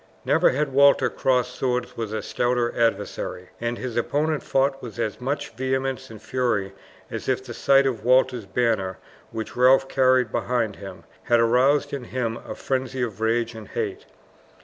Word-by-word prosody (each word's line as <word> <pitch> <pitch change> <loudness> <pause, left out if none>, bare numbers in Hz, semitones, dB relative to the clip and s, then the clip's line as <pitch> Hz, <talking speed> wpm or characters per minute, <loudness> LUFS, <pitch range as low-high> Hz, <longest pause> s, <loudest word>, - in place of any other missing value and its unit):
Never - - +4
had 140 0 -1
Walter 140 +1 +5
crossed 125 -1 +1
swords 125 -1 -2
with 115 -2 -4
a 110 - -3
stouter 120 -1 0
adversary, 115 -5 -1
and 120 0 -2
his 125 -3 -5
opponent 150 +5 0
fought 135 0 0
with 120 -2 -9
as 110 -1 -3
much 140 +4 -3
vehemence 130 0 -2
and 110 -2 -10
fury 110 -5 -1 0.4
as - - -4
if 130 0 0
the 120 - -7
sight 135 +3 +4
of 120 -5 -1
Walter's 125 -3 +3
banner, 95 -3 0 0.3
which 110 -1 -6
Ralph 130 +2 +5
carried 130 -3 +3
behind 115 -5 -1
him, 95 -4 -10 0.2
had 120 -1 +4
aroused 125 +6 +3
in 135 -3 -4
him 120 -2 -2
a - - -8
frenzy 130 -1 -2
of 110 -3 -5
rage 115 +1 +1
and 110 -2 -10
hate. - - -4
125 Hz, 170 wpm, -24 LUFS, 115-130 Hz, 0.4 s, Walter